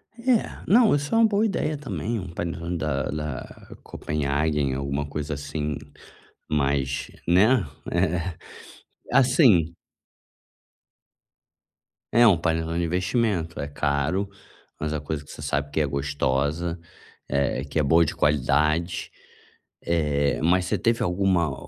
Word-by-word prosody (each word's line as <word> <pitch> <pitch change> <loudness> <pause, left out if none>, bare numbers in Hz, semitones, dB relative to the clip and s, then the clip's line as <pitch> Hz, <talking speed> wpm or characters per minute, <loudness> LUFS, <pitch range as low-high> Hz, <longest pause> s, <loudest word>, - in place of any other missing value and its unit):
É 235 -1 0
não, 220 -4 +5
isso 145 0 -3
é 225 - +4
uma 230 - +6
boa 210 0 +2
ideia 155 -7 -1
também 120 -5 -3
um 90 -2 -7
panetone 85 +1 -3
da 75 -4 -1
da 75 -4 -6
Kopenhagen, 75 -1 -1
alguma 70 +2 -2
coisa 75 0 -4
assim 75 +1 -3 0.7
mas, 70 -2 0 0.2
né 105 +6 +4 0.3
Eh, 85 +2 0 0.8
assim. 125 - +4 2.4
É 120 +2 +6
um 100 -7 +6
panelão 80 0 -1
de 85 - 0
investimento, 90 -1 -1
é 70 - -3
caro, 75 +8 -1 0.5
mas 80 0 -2
a 75 - -1
coisa 75 0 -4
que - - -13
você - - -10
sabe 70 +1 -2
que 80 - +1
é - - +2
gostosa, 70 +4 -1 0.5
eh, 70 -1 0
que 70 - -5
é - - +2
boa 80 +4 +4
de - - -3
qualidade, 75 +4 +1 0.7
eh, 75 -4 0
mas 90 +2 +3
você - - 0
teve 115 0 +1
alguma 90 -5 +1
80 Hz, 130 wpm, -25 LUFS, 70-95 Hz, 2.4 s, uma